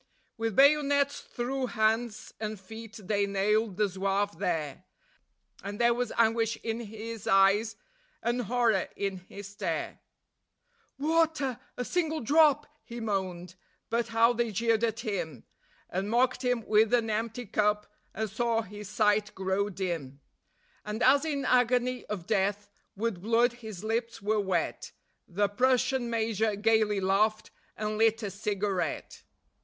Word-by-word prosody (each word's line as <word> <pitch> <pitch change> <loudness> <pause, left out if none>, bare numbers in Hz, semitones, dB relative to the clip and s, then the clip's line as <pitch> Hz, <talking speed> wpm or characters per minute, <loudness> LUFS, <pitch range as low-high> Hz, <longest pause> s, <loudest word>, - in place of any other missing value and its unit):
With 225 -2 -2
bayonets 285 +1 +4
through 255 +1 -3
hands 220 0 0
and 215 -1 -4
feet 220 +3 -10
they 200 +1 +1
nailed 200 +1 +1
the 210 -1 +3
Zouave 195 -1 -1
there, 165 -3 -2 0.8
And 200 +1 -5
there 235 0 +4
was 245 -1 -2
anguish 225 0 +2
in 225 0 -2
his 225 0 -7
eyes, 200 +3 +4 0.5
and 240 +1 0
horror 230 -3 +1
in 195 -1 -2
his 195 +2 -10
stare; 205 - -3 1.0
"Water! 310 -4 +1 0.2
A 250 - -2
single 320 -1 0
drop!" 295 +2 +4 0.2
he 235 -1 -8
moaned; 185 -5 -3 0.4
but 235 0 +1
how 230 +1 +4
they 240 0 0
jeered 225 +2 +1
at 230 0 0
him, 185 - -4 0.4
And 190 +3 -3
mocked 250 +3 +2
him 245 -3 0
with 220 +2 +4
an 225 -2 0
empty 225 +3 -2
cup, 210 0 +1 0.3
and 220 0 -3
saw 230 +2 0
his 210 0 -9
sight 210 0 +1
grow 190 +2 0
dim; 170 -8 -4 0.6
And 210 +2 -3
as 275 +4 +5
in 285 -3 -2
agony 250 0 +2
of 200 -5 -5
death 205 0 0 0.2
with 205 -3 -2
blood 230 +3 +3
his 220 -5 -9
lips 230 +1 -2
were 210 +2 0
wet, 190 -3 -2 0.3
The 200 +3 +1
Prussian 255 +3 +1
Major 220 -2 0
gaily 215 -1 +2
laughed, 210 +3 +1 0.3
and 215 0 -2
lit 225 0 +3
a 200 - -3
cigarette. 200 -4 -2
220 Hz, 140 wpm, -29 LUFS, 200-235 Hz, 1.0 s, as